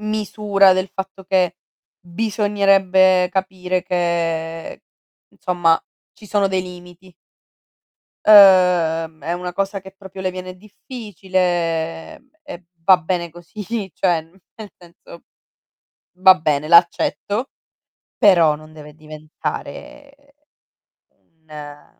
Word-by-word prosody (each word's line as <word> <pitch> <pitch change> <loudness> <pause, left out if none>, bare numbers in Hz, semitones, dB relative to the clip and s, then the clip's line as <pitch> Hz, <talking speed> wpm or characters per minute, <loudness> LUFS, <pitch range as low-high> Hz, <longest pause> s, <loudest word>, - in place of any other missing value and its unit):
misura 210 -2 +2
del 185 +1 -1
fatto 190 0 -7
che 180 -2 0 0.4
bisognerebbe 190 -1 +2
capire 185 -1 -2
che, 165 -2 -3 0.5
insomma, 175 -3 0 0.3
ci 210 - -16
sono 200 -1 0
dei 190 -1 -1
limiti. 180 0 -13 1.1
Uhm, 180 -6 +5
è 170 - -2
una 180 0 -6
cosa 195 +1 -3
che 190 0 -14
proprio 190 -1 -12
le 185 -1 -2
viene 185 0 -8
difficile, 180 -6 -4 0.2
e 180 - -11 0.2
va 185 +1 +6
bene 175 0 -3
così. 175 +5 -11 0.3
Cioè, 175 -4 0
n 160 +1 -23 0.2
nel 215 -2 -11
senso: 170 -1 -17 0.9
va 185 0 +7
bene, 150 -1 -1
l'accetto, 180 - +2 0.7
però 170 -7 +4
non 155 +1 -13
deve 150 -1 -13
diventare 155 - -8 1.0
un 150 -2 -14
180 Hz, 100 wpm, -19 LUFS, 165-195 Hz, 1.1 s, va